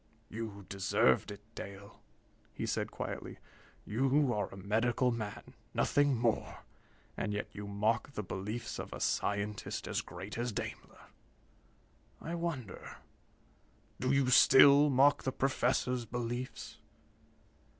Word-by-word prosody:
"You 110 -3 -6
deserved 95 -9 +2
it, 100 0 -8
Dale," 100 +1 -9 0.5
he - - -3
said - - -1
quietly. - - -6 0.5
"You 135 +4 +2
are 105 -1 -1
a - - -10
medical 115 +5 +1
man, 110 -3 -6 0.2
nothing 145 -2 +3
more, 115 -1 -1 0.5
and 105 - -2
yet 105 - -3
you 105 0 -7
mock 110 +6 0
the 105 - -3
beliefs 105 +5 -5
of - - -6
a - - -6
scientist 100 +1 -1
as - - -1
great 100 +4 -8
as 120 0 -1
Daimler. - - -6 1.1
I 165 - -6
wonder 165 - -5 1.0
do 130 +1 +1
you 135 -2 +3
still 140 +3 +8
mock 140 +2 +5
the 130 - -1
Professor's 125 -2 0
beliefs?" 120 +2 -5
115 Hz, 120 wpm, -33 LUFS, 105-130 Hz, 1.1 s, still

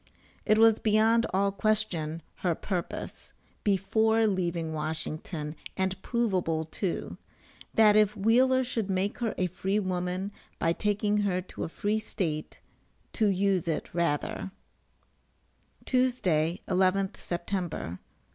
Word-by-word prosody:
It 215 - +5
was 225 0 +6
beyond 225 +2 +3
all 195 +1 +2
question 195 -7 0
her 175 -3 0
purpose, 180 -1 -5 0.3
before 220 +3 +2
leaving 170 -5 -1
Washington 155 0 -3 0.2
and 190 0 -1
provable 185 -9 0
too, 175 +3 -3 0.6
that 215 -2 +6
if 210 0 +4
Wheeler 255 +5 +4
should 230 -5 -2
make 190 +2 -1
her 230 -3 -1
a 185 - +1
free 190 +3 -1
woman 185 0 -2 0.3
by 165 - +1
taking 210 +1 0
her 200 -3 +1
to - - -6
a - - -6
free 210 +5 -1
state 165 -8 -3 0.5
"to 220 - +2
use 195 -2 +1
it 160 - -2
rather." 170 +2 -1 1.4
Tuesday, 185 - +1
11th 190 +1 +2
September. 175 - -3
195 Hz, 120 wpm, -28 LUFS, 170-215 Hz, 1.4 s, was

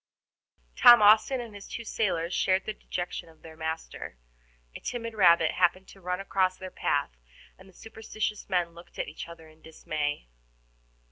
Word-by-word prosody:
Tom 240 0 +9
Austin 215 +5 +5
and 235 -3 -7
his 205 -1 -10
two 235 - -6
sailors 185 -6 -1
shared 190 0 +1
the 215 - -3
dejection 175 -4 -6
of 160 - -21
their 160 -1 -12
master. 160 - -6 0.6
A - - -6
timid 230 -2 -5
rabbit 170 -6 +5
happened 185 +1 +1
to 195 - -16
run 180 0 -3
across 185 -1 0
their 185 -1 -8
path, - - -1 0.4
and 190 +1 -17
the - - -20
superstitious 215 0 -5
men 180 -3 +1
looked 170 +1 -15
at - - -3
each - - -8
other 165 -1 -12
in 155 0 -20
dismay. 150 - -4
185 Hz, 165 wpm, -28 LUFS, 165-210 Hz, 0.6 s, Tom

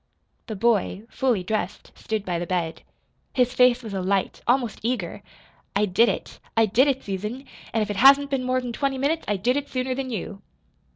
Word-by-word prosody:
The 220 - -4
boy, 210 -2 +1
fully 245 -8 +1
dressed, 200 -1 -3
stood 215 -2 -4
by 175 -2 -1
the 175 - -4
bed. 170 -3 -2 0.5
His 250 -1 +2
face 250 -1 +4
was 220 -3 -6
alight, 195 0 -1
almost 245 -3 +1
eager. 225 -7 -2 0.5
"I 205 +1 +3
did 210 +5 +4
it - - -5 0.2
I 225 - +6
did 230 +7 +3
it, 270 -1 0
Susan! 210 +7 -4 0.3
And 220 -1 +1
if 210 - -3
it 205 - -4
hasn't 280 +4 +6
been 265 -2 0
more 255 0 +1
than 245 -1 -5
twenty 275 +1 -1
minutes, 300 +5 0
I 205 - +1
did 245 +8 +1
it 285 0 -3
sooner 255 0 -1
than 260 0 -4
you!" 205 -3 -5
235 Hz, 195 wpm, -24 LUFS, 200-255 Hz, 0.5 s, I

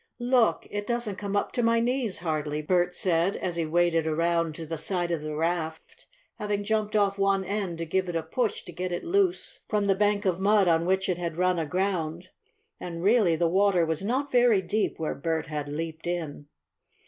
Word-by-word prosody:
"Look! 245 -1 +2
It 205 0 -4
doesn't 235 -5 -1
come 200 -1 -3
up 200 - 0
to 245 - -1
my 230 0 +3
knees, 240 -3 0
hardly," 155 -2 -2
Bert 180 +2 +1
said, 175 +1 +1
as 175 -2 -3
he 165 -2 -1
waded 165 0 +2
around 165 0 0
to 165 - -6
the 160 0 -5
side 175 0 -1
of 165 -3 -1
the 155 0 -5
raft, 160 0 -3 0.3
having 205 -1 -1
jumped 215 0 -1
off 200 -1 +2
one 195 -1 +2
end 195 -3 -3
to 165 - -3
give 185 +2 -1
it 175 - -4
a 165 - 0
push 220 +8 -2
to - - -10
get 180 +1 -4
it 175 - -3
loose 370 0 0
from 210 -1 +1
the 195 - +4
bank 205 +1 +1
of 185 -2 +1
mud 200 0 +4
on 165 0 +2
which 190 +1 +1
it 180 -2 -1
had 170 -2 -4
run 180 -1 +2
aground. 175 0 -2 0.5
And, 170 -1 -6
really, 205 -5 +4
the 170 +1 +1
water 190 -1 +3
was 160 0 -2
not 260 +7 -1
very 245 -4 +5
deep 210 +5 -1
where 160 -1 -2
Bert 160 +2 -2
had 150 -2 -4
leaped 160 +2 -5
in. 160 -4 -4
180 Hz, 205 wpm, -27 LUFS, 165-205 Hz, 0.5 s, very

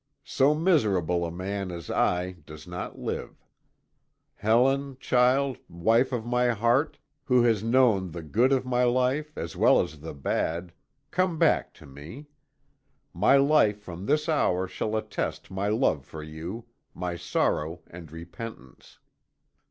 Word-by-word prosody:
So 145 +3 +3
miserable 100 - +2
a - - -6
man 95 +2 -4
as 85 -2 -7
I 90 +1 +1 0.2
does 75 -1 -11
not 90 0 -6
live. - - -6 0.9
Helen, 130 +6 +1
child, 130 +1 +2
wife 115 +10 +2
of 120 -3 -3
my 125 +1 +1
heart, 120 +6 +1 0.3
who 125 -2 +4
has 110 -3 +2
known 115 -6 +3
the 85 0 -7
good 115 - +2
of 130 -1 +2
my 125 -1 +1
life 130 +5 0
as 85 - -5
well - - +5
as 75 0 -3
the 80 +2 -8
bad, 85 +5 -2 0.4
come 185 -2 +1
back - - +2
to - - -15
me. 75 - -11 0.8
My 105 +10 +4
life 135 -7 +3
from 90 -1 -8
this 150 +2 +1
hour 95 - +1
shall 110 +4 -3
attest 110 - -4
my 95 +2 -2
love 105 - +1
for 75 +2 -9
you, 80 +9 -7 0.3
my 90 -1 -3
sorrow 85 -1 -1
and 85 -3 -12
repentance. 85 - -10
105 Hz, 145 wpm, -27 LUFS, 85-130 Hz, 0.9 s, well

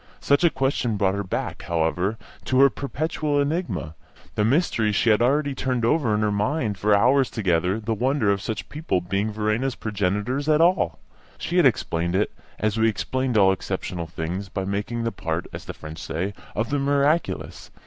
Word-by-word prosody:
Such 140 +4 +2
a 170 - +6
question 130 -6 0
brought 95 -2 +2
her 100 0 -2
back, 95 - -4
however, 85 +5 0 0.3
to 130 - +2
her 140 -1 +7
perpetual 145 +3 -2
enigma, 140 - -1 0.4
the 105 - +1
mystery 115 -3 +2
she 110 +2 +3
had 105 - +3
already 140 +3 +2
turned 125 -3 -1
over 120 -5 +2
in 105 - 0
her 105 -1 +1
mind 105 0 -1
for 105 +1 +4
hours 130 +5 +4
together 90 -1 0
the 110 +1 -2
wonder 125 -1 +1
of 100 -1 0
such 110 0 -4
people 150 - -1
being 100 +4 -1
Verena's 110 +5 -1
progenitors 105 +7 -1
at 155 0 +4
all. 170 - +3 0.4
She 175 - -2
had 170 -6 +7
explained 85 -7 -1
it, 100 - +1 0.3
as 110 +1 0
we 110 0 +4
explain 130 +2 -1
all 95 -2 +6
exceptional 95 -3 -3
things, 85 +4 -4
by 95 0 -3
making 105 +4 -2
the 115 - -1
part, 85 -3 -3
as - - -7
the - - -6
French 80 +1 -9
say, 95 +6 -3 0.2
of 115 +4 -1
the 145 - +1
miraculous. 145 +4 0
110 Hz, 185 wpm, -24 LUFS, 95-135 Hz, 0.4 s, her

